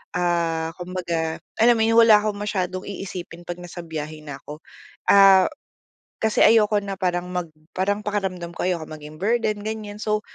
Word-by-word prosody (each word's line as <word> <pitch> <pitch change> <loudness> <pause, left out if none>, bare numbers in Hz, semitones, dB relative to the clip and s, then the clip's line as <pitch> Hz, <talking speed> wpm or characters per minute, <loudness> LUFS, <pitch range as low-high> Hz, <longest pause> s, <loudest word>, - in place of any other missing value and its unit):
ah, 170 -2 0
kumbaga, 170 -3 -3 0.2
alam 235 +1 +6
mo - - +3
'yon, 225 - +2
wala 225 -2 +8
akong 210 -1 -2
masyadong 185 -2 -2
iisipin 180 -3 -7
'pag 175 0 -5
nasa 175 0 -9
biyahe 155 -1 -6
na 145 -2 -8
ko. 150 +1 -8 0.5
Ah, 195 -2 +7 0.7
kasi 220 -1 +1
ayoko 215 -2 +5
na 195 -1 -4
parang 180 -1 -1
mag 180 -2 -3 0.3
parang 200 +2 0
pakiramdam 190 -4 -3
ko - - -2
ayoko 170 -3 -1
maging 155 0 -10
burden, 215 -1 0
ganyan. 215 -1 -5
So, 215 -1 0
185 Hz, 160 wpm, -23 LUFS, 170-210 Hz, 0.7 s, wala